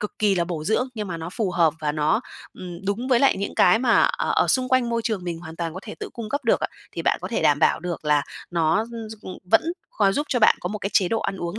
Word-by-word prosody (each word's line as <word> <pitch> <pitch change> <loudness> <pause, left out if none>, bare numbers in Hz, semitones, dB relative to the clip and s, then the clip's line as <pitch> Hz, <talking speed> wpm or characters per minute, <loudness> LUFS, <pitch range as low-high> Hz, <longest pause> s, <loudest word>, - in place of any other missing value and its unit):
cực 210 - -6
kỳ 210 -2 +3
là 175 -2 +1
bổ 170 -3 -5
dưỡng, 220 +7 +1
nhưng 210 -3 -4
mà 170 - -4
nó 165 +1 -6
phù 210 -2 -2
hợp 165 -3 +2
và 150 -1 -1
nó, 150 0 +1 0.3
ừm, 175 -2 -8
đúng 220 +6 -2
với 250 -3 +4
lại 275 - +4
những 200 - -4
cái 225 - +5
mà, 235 -1 +4
ờ, - - 0
ở - - +3
xung 255 -1 +2
quanh 255 -2 +2
môi 230 0 0
trường 215 -6 -2
mình 170 -2 -4
hoàn 165 -1 -10
toàn 165 -1 -4
có 185 - -6
thể 215 - -8
tự - - -4
cung 230 -3 -6
cấp 285 +3 -3
được 230 - +3
á, - - 0 0.3
thì - - -4
bạn - - +2
có - - -4
thể - - -1
đảm - - +4
bảo - - +3
được 175 -3 -5
là 150 -1 +3 0.3
nó, 165 +2 +2
ưm, 225 -2 -7
s - - -6
ừm, 185 - -8
vẫn 225 - +6 0.3
có 200 -2 +2
giúp 290 +8 -1
cho 255 - +1
bạn 215 - +5
có 180 - -3
một 210 +1 -4
cái 200 +1 -3
chế 195 -3 +3
độ 225 +2 0
ăn 195 - -3
uống 175 +3 -4
200 Hz, 305 wpm, -23 LUFS, 170-230 Hz, 0.3 s, vẫn